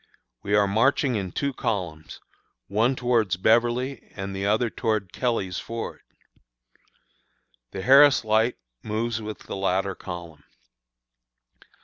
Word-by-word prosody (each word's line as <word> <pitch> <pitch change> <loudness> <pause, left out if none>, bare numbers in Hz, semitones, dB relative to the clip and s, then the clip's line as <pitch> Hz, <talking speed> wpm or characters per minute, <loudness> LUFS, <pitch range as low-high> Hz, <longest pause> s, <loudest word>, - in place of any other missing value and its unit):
We 100 +1 0
are 105 -1 +4
marching 125 +6 +2
in 95 -5 -3
two 140 +6 -2
columns, 85 -10 -4 0.5
one 115 - +1
towards 115 -8 +1
Beverly 120 +5 +1
and 95 -1 -5
the 100 +1 -2
other 110 +4 +2
towards 105 -5 -1
Kelly's, 110 -8 -1
Fords. 115 0 -6 1.7
The 95 - -6
Harris 135 +1 +6
Light 110 +3 +2 0.2
moves 110 +1 -2
with 110 0 -6
the - - -7
latter 95 0 0
column. 85 -5 -9
110 Hz, 115 wpm, -25 LUFS, 95-120 Hz, 1.7 s, Harris